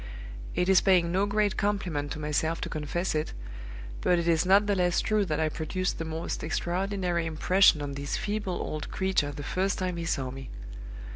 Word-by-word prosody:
It 180 - +1
is 190 -1 +6
paying 180 -3 +3
no 195 +3 +2
great 205 -1 +1
compliment 180 -8 -1
to - - -7
myself 155 +2 -1
to - - -3
confess 160 +4 -2
it, 155 0 -2 0.7
but 180 - +3
it 170 0 -1
is 170 +1 +2
not 200 +2 +6
the 205 - +1
less 180 -2 +2
true 215 -2 +1
that 155 -4 -1
I 160 - +2
produced 170 +4 -2
the 165 - -3
most 160 +1 -4
extraordinary 175 +1 -1
impression 160 0 +4
on 140 -1 -4
this 140 +1 -3
feeble 205 -3 -2
old 155 -3 -4
creature 190 -6 0
the 145 - -7
first 190 +6 -1
time 180 -2 -2
he 170 - -3
saw 135 -5 -1
me. 135 0 -8
175 Hz, 195 wpm, -28 LUFS, 155-190 Hz, 0.7 s, is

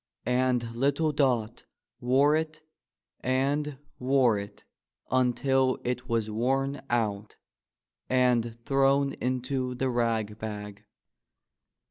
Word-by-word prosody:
And 125 -2 +1
little 140 +5 +1
Dot 125 -6 0 0.3
wore 135 +4 +3
it 155 -1 -3 0.6
and 140 +3 0 0.2
wore 125 -3 +3
it 100 0 -7 0.5
until 130 +1 +2
it 125 +1 -3
was 115 -2 0
worn 135 +5 -1
out 105 -3 -1 0.7
and 125 -3 +2
thrown 135 0 +3
into 125 0 -2
the 130 +1 -1
rag 115 -3 -1
bag. 105 -1 -7
125 Hz, 95 wpm, -28 LUFS, 115-135 Hz, 0.7 s, wore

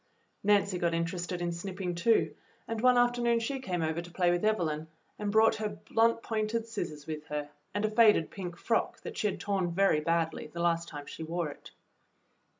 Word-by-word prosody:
Nancy 200 -2 +3
got 170 -1 +1
interested 175 +1 -2
in 175 - 0
snipping 180 +1 -4
too, 220 +7 +2 0.3
and 225 -1 -3
one 250 0 +5
afternoon 240 -1 +3
she 265 +4 -2
came 180 -10 -2
over 160 +1 -1
to 175 - -11
play 175 0 +2
with 175 +2 0
Evelyn 160 -8 0 0.3
and 205 -1 -1
brought 220 +1 +5
her 215 -1 -2 0.2
blunt 230 0 +3
pointed 220 +1 -1
scissors 175 -10 -5
with 155 -1 -5
her, 150 -1 -4 0.2
and 205 +1 -1
a - - +1
faded 215 -7 +5
pink 180 -3 -6
frock 225 +5 0
that - - -7
she 210 - +1
had 200 - -3
torn 195 -3 0
very 190 -3 +3
badly 165 0 0
the 170 +3 -9
last 170 0 +1
time 145 -3 -7
she - - -9
wore 165 0 -2
it. - - -13
180 Hz, 195 wpm, -30 LUFS, 170-220 Hz, 0.3 s, one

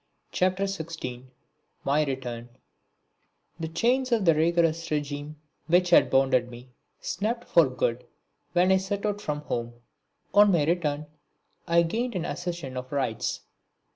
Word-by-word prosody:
PART 185 +1 +1
IV 200 - +1
(16) 160 -9 -6 0.5
My 145 +2 +2
Return 125 -4 -5 1.1
The 160 - -3
chains 245 +10 +1
of 225 -5 +2
the 165 - +6
rigorous 165 +1 +1
regime 145 0 -3 0.3
which 175 +1 +3
had - - +6
bound 135 0 +3 0.2
me 120 +1 -12 0.3
snapped 230 +4 -3
for - - +5
good - - -2 0.5
when 180 +1 +4
I 190 - +6
set 195 +2 -3
out 205 -1 -1
from 150 -6 -3
home. 120 -4 -4 0.6
On 205 0 +7
my 165 -5 +3
return 155 -3 0 0.6
I 170 0 +4
gained 230 +7 -2
an 175 -2 -2
accession 170 -9 -5
of 125 0 -6
rights. 130 -6 -2
165 Hz, 140 wpm, -27 LUFS, 145-190 Hz, 1.1 s, On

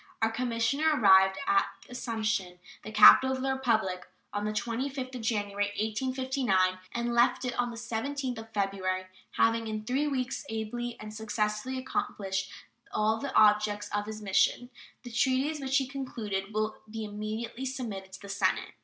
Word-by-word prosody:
Our 225 0 +2
commissioner 250 +6 +1
arrived 190 -2 +6
at 195 - +4 0.2
Assumption, 220 -7 -2 0.2
the 215 - -8
capital 260 +5 +8
of 260 - -4
the 270 0 +1
Republic, 220 -8 0 0.3
on 205 0 -2
the 215 - 0
25th 255 +4 -3
of 250 - -5
January, 205 -3 0
1859, 220 -4 0
and 235 0 -2
left 240 +2 +3
it 250 - -1
on 245 0 +1
the 235 - -8
17th 245 +2 -3
of 225 0 -11
February, 195 -2 -1 0.3
having 225 0 +2
in 215 -1 -4
three 270 +6 0
weeks 265 -2 -2
ably 230 +2 -4
and 215 0 -8
successfully 215 +3 -2
accomplished 195 -6 -2 0.4
all 215 +1 +1
the 280 - -4
objects 210 -1 +4
of 205 0 -1
his 215 0 -6
mission. 210 +5 +2 0.3
The 245 - -8
treaties 260 +6 +1
which 270 0 +1
he 275 - +2
has 260 - -12
concluded 215 -8 -4
will 215 0 -1
be 220 0 -5
immediately 220 +4 -5
submitted 225 -8 -5
to - - -9
the 200 - -10
Senate. 195 -1 0
225 Hz, 160 wpm, -29 LUFS, 210-255 Hz, 0.4 s, capital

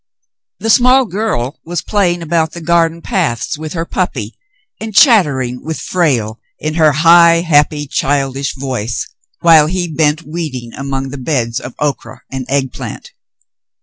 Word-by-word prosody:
The 225 - 0
small 255 +2 +5
girl 195 - -3
was 175 -1 -4
playing 175 -5 0
about 160 -1 0
the 170 - -7
garden 170 0 +1
paths 150 - -1
with 155 +1 -7
her 165 -1 -3
puppy 130 - -3 0.4
and 220 -2 -7
chattering 140 - +3
with 160 0 -4
Frale 125 -11 -1 0.2
in 155 0 -3
her 155 -2 +4
high, 170 +3 +5
happy, 150 -2 +2
childish 135 -1 -1
voice, 130 -4 -3 0.3
while 160 -3 +6
he 180 +1 -2
bent 155 0 0
weeding 150 -8 -6
among 135 -1 -4
the 140 +1 -7
beds 125 -4 -1
of 125 - -9
okra 145 -1 -4
and 130 -1 -5
egg 135 -1 0
plant. - - -8
155 Hz, 150 wpm, -15 LUFS, 135-170 Hz, 0.4 s, while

